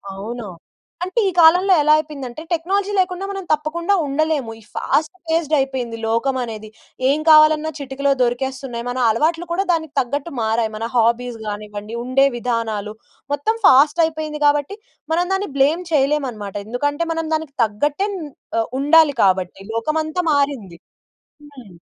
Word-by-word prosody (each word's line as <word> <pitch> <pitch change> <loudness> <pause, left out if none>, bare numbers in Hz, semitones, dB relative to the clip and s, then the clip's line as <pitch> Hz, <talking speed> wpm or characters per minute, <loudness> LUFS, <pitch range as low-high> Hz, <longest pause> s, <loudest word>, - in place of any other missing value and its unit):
అవును. 220 +3 -6 0.6
అంటే 370 +6 -1
ఈ - - -3
కాలంలో 360 +4 +6
ఎలా 300 +1 +5
అయిపోయిందంటే 290 -3 -6
టెక్నాలజీ 385 +5 0
లేకుండా 365 +1 -1
మనం 390 -1 -5
తప్పకుండా 310 +5 0
ఉండలేము. 290 -3 -1
ఈ - - -19
ఫాస్ట్ 315 +3 0
ఫేస్డ్ 320 -1 0
అయిపోయింది 260 -4 -2
లోకం 230 +4 0
అనేది. 220 -2 -7 0.4
ఏం 295 +2 +2
కావాలన్నా 310 0 +6
చిటికలో 280 0 -1
దొరికేస్తున్నాయి. 245 0 -2
మన 250 +1 -3
అలవాట్లు 325 +9 +1
కూడా 365 +3 +1
దానికి 320 -3 -3
తగ్గట్టు 285 +6 -2
మారాయి. 225 0 0
మన 225 +2 -3
హాబీస్ 235 +1 +1
గానివ్వండి, 210 +1 -6
ఉండే 255 +2 +3
విధానాలు, 225 -3 -2 0.4
మొత్తం 440 +11 -1
ఫాస్ట్ 295 +5 +5
అయిపోయింది 310 -1 -5
గాబట్టి 290 +7 +1 0.4
మనం 350 +2 +2
దాన్ని 385 -2 -1
బ్లేమ్ 315 +6 +3
చేయలేమన్నమాట. 270 -9 0
ఎందుకంటే 290 +7 -1
మనం 325 0 -3
దానికి 310 -3 -5
తగ్గట్టే 290 - -1
న్ 375 - -5 0.4
ఆహ్, 225 - -1
ఉండాలి 300 0 +5
కాబట్టి. 185 0 +1
లోకమంతా 310 +8 -1
మారింది. 265 -12 -1 0.7
హ్మ్. 220 -10 -14
280 Hz, 140 wpm, -20 LUFS, 235-315 Hz, 0.7 s, కాలంలో